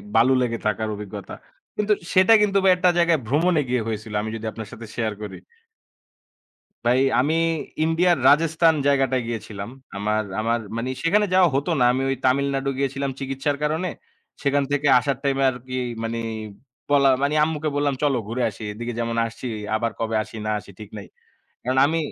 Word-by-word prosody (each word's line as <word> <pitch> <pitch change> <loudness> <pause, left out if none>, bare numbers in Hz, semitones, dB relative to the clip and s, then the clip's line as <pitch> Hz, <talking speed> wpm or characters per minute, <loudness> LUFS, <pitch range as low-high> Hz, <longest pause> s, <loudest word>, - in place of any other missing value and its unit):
বালু 120 +4 +5
লেগে 115 -2 -1
থাকার 110 +1 -1
অভিজ্ঞতা। 100 -1 -8 0.4
কিন্তু 210 0 +2 0.2
সেটা 185 +4 +6
কিন্তু 200 -1 +2
ভাই 190 - +6
একটা 180 0 +3
জায়গায় 170 -3 +3
ভ্রমণে 160 +4 +2
গিয়ে 125 -2 +1
হয়েছিল। 110 -1 -5
আমি 110 - -4
যদি 110 0 -6
আপনার 110 -2 -8
সাথে 115 -2 -9
শেয়ার 110 -3 -1
করি 105 - -6 1.5
ভাই 125 +2 +4 0.2
আমি 155 +4 +1 0.5
ইন্ডিয়ার 170 +2 +3
রাজেস্থান 160 +2 +4
জায়গাটায় 135 -3 +2
গিয়েছিলাম। 105 -3 -5 0.3
আমার, 105 +1 0 0.2
আমার 115 +2 0 0.2
মানি 125 +3 -2
সেখানে 210 +5 +3
যাওয়া 185 -2 +5
হতো 145 +5 0
না। - - +4
আমি 130 - -1
ওই 135 - +1
তামিলনাড়ু 135 +1 +1
গিয়েছিলাম 135 0 -1
চিকিৎসার 135 +1 -2
কারণে। 160 +5 0 0.5
সেখান 140 0 +2
থেকে 145 0 +1
আসার 135 +1 -1
টাইম 135 -1 +1
এ - - +3
আরকি 130 +1 -8 0.3
মানি 115 +1 -3 0.7
বলা 140 -1 +5
মানি, 140 +2 +1
আম্মুকে 155 -1 -1
বললাম 145 -1 +1
"চলো 140 -3 +2
ঘুরে 120 +3 -2
আসি। 110 - -13
এদিকে 120 +3 -5
যেমন 115 0 -2
আসছি 115 +3 -8 0.3
আবার 115 +1 -1
কবে 115 -1 -1
আসি 105 - -13
না 110 - 0
আসি, 100 - -14
ঠিক 105 -1 -9
নাই।" 100 - -9 0.6
কারণ 130 +2 0
আমি 165 +2 0
135 Hz, 175 wpm, -23 LUFS, 115-150 Hz, 1.5 s, সেটা